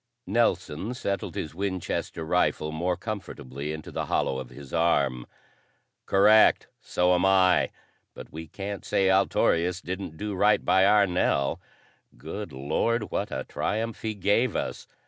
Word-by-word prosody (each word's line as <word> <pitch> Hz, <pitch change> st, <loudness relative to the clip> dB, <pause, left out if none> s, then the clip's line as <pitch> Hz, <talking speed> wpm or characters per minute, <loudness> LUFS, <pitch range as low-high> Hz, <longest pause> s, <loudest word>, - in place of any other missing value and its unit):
Nelson 100 Hz, -1 st, 0 dB
settled 100 Hz, -5 st, -3 dB
his 80 Hz, -, -4 dB
Winchester 95 Hz, -3 st, -3 dB
rifle 75 Hz, 0 st, +1 dB
more 85 Hz, +3 st, -1 dB
comfortably 75 Hz, -, -6 dB
into 80 Hz, 0 st, -7 dB
the -, -, -3 dB
hollow 65 Hz, -, 0 dB
of 65 Hz, -2 st, -7 dB
his 70 Hz, +1 st, -12 dB
arm. 70 Hz, -7 st, +1 dB, 0.8 s
"Correct. 105 Hz, +3 st, +5 dB
So 90 Hz, +1 st, +1 dB
am 90 Hz, 0 st, +2 dB
I. 95 Hz, -1 st, +4 dB, 0.5 s
But -, -, -10 dB
we 80 Hz, +1 st, -7 dB
can't 100 Hz, +3 st, -6 dB
say 95 Hz, -1 st, +2 dB
Altorius 90 Hz, -2 st, +2 dB
didn't 90 Hz, -3 st, -6 dB
do 105 Hz, +2 st, -4 dB
right 105 Hz, +2 st, +3 dB
by 95 Hz, +1 st, +4 dB
our 105 Hz, 0 st, +5 dB
Nell. 90 Hz, -6 st, 0 dB, 0.6 s
Good 105 Hz, -5 st, -7 dB
Lord, 80 Hz, -, -1 dB
what -, -, -2 dB
a -, -, -3 dB
triumph 115 Hz, +2 st, -3 dB
he 110 Hz, -1 st, -3 dB
gave 100 Hz, +5 st, +1 dB
us!" -, -, -4 dB
95 Hz, 145 wpm, -26 LUFS, 80-100 Hz, 0.8 s, Correct